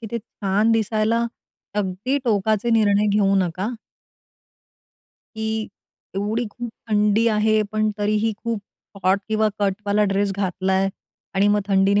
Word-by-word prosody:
की 225 Hz, -, -6 dB
ते 235 Hz, -, -2 dB
छान 210 Hz, 0 st, 0 dB
दिसायला 225 Hz, +1 st, +1 dB, 0.5 s
अगदी 210 Hz, +7 st, -1 dB
टोकाचे 215 Hz, +1 st, +1 dB
निर्णय 210 Hz, -2 st, +3 dB
घेऊ 195 Hz, -1 st, +3 dB
नका. 185 Hz, +4 st, 0 dB, 1.7 s
की 220 Hz, 0 st, -2 dB, 0.7 s
एवढी 215 Hz, +4 st, -1 dB
खूप 240 Hz, +1 st, -6 dB, 0.2 s
थंडी 210 Hz, +2 st, +3 dB
आहे 215 Hz, 0 st, +3 dB
पण 215 Hz, 0 st, +1 dB
तरीही 215 Hz, +2 st, +1 dB
खूप 230 Hz, -3 st, -1 dB, 0.4 s
हॉट 190 Hz, +2 st, +3 dB
किंवा 215 Hz, 0 st, +2 dB
कटवाला 205 Hz, +1 st, +1 dB
ड्रेस 200 Hz, 0 st, +1 dB
घातलाय 190 Hz, 0 st, 0 dB, 0.5 s
आणि 200 Hz, +2 st, +3 dB
मग 210 Hz, 0 st, +3 dB
थंडीने 195 Hz, +1 st, +4 dB
210 Hz, 125 wpm, -22 LUFS, 195-220 Hz, 1.7 s, थंडीने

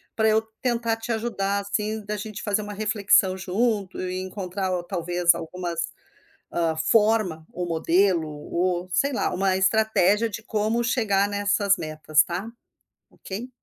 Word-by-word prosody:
Pra 220 Hz, 0 st, +2 dB
eu 220 Hz, 0 st, +4 dB, 0.2 s
tentar 235 Hz, -2 st, 0 dB
te 225 Hz, +1 st, -5 dB
ajudar 210 Hz, -3 st, -1 dB
assim, 210 Hz, +2 st, -2 dB
da 210 Hz, +1 st, -3 dB
gente 210 Hz, 0 st, -6 dB
fazer 210 Hz, 0 st, 0 dB
uma 205 Hz, 0 st, -6 dB
reflexão 205 Hz, -2 st, +3 dB
junto 195 Hz, +1 st, -1 dB
e 185 Hz, 0 st, -3 dB
encontrar 190 Hz, 0 st, -4 dB
talvez 175 Hz, 0 st, +2 dB
algumas, 170 Hz, 0 st, -5 dB, 0.7 s
hã, 165 Hz, -2 st, 0 dB
forma 185 Hz, -1 st, +2 dB
ou 180 Hz, -, -3 dB
modelo, 170 Hz, +1 st, +2 dB, 0.3 s
ou 180 Hz, 0 st, 0 dB
sei 280 Hz, +7 st, +2 dB
lá, -, -, 0 dB
uma 190 Hz, +1 st, +1 dB
estratégia 210 Hz, +1 st, +3 dB
de 225 Hz, +1 st, -7 dB
como 220 Hz, +2 st, 0 dB
chegar 205 Hz, -5 st, +1 dB
nessas 205 Hz, 0 st, +2 dB
metas, 155 Hz, -1 st, +2 dB
tá. 180 Hz, +5 st, -4 dB, 0.6 s
Ok? 215 Hz, +6 st, -7 dB
200 Hz, 140 wpm, -25 LUFS, 180-220 Hz, 0.7 s, eu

